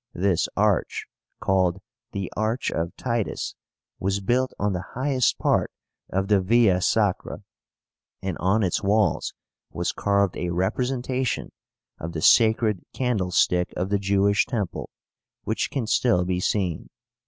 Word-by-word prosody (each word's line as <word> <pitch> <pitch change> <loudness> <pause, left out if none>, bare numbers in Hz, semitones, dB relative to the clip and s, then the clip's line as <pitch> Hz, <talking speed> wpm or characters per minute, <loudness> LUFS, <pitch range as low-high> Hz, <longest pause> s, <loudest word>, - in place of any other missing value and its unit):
This 90 -1 +1
arch, - - +1 0.3
called 95 -1 +1 0.3
the 100 -3 -4
ARCH 110 +4 -1
OF 85 +1 -3
TITUS, 115 -4 -2 0.5
was 100 +1 0
built 125 +6 +1
on 105 -1 0
the 90 0 -6
highest 130 0 +1
part - - +1 0.4
of 95 +1 -1
the 100 -2 +4
Via 100 -2 +4
Sacra, 105 -1 0 0.8
and 95 -3 -3
on 100 +4 +2
its 90 - 0
walls 100 -3 +1 0.3
was - - -2
carved 100 -2 +1
a 90 - -2
representation 125 +7 -1 0.5
of 85 +1 -5
the 80 - -3
sacred 110 -3 +4
candlestick 90 -7 +1
of 90 +2 -1
the 100 - +2
Jewish 100 +1 +2
temple, 105 -8 -3 0.5
which - - -1
can 130 -4 -2
still 110 -5 +2
be 90 0 -1
seen. 90 -3 -1
100 Hz, 130 wpm, -25 LUFS, 90-115 Hz, 0.8 s, the